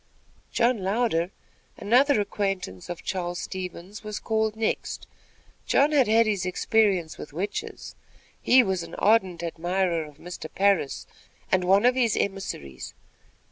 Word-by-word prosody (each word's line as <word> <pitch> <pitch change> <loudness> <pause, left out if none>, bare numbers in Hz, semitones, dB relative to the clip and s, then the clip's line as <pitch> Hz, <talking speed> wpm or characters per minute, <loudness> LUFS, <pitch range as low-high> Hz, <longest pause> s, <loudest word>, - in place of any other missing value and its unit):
John 240 -1 +2
Louder, 190 -3 0 0.5
another 250 +3 +4
acquaintance 195 - -3
of 175 - -6
Charles 175 -2 -3
Stevens, 185 +3 -6
was 210 -1 -5 0.4
next 220 0 -2
called. - - -36 0.6
John 285 +2 +4
had 275 -6 +4
had 225 +2 +5
his 205 -4 0
experience 185 -2 +1
with 150 - -9
witches. 195 +6 -5 0.5
He 255 0 +6
was 190 -4 -1
an 170 0 -8
ardent 190 -5 +2
admirer 170 0 -1
of 150 -1 -14
Mr. 175 -1 -8
Parris, 195 -8 +1 0.5
and 185 -1 +2
one 195 +4 +4
of 250 - +6
his 240 -4 +1
emissaries. 190 - -4
195 Hz, 135 wpm, -26 LUFS, 175-220 Hz, 0.6 s, He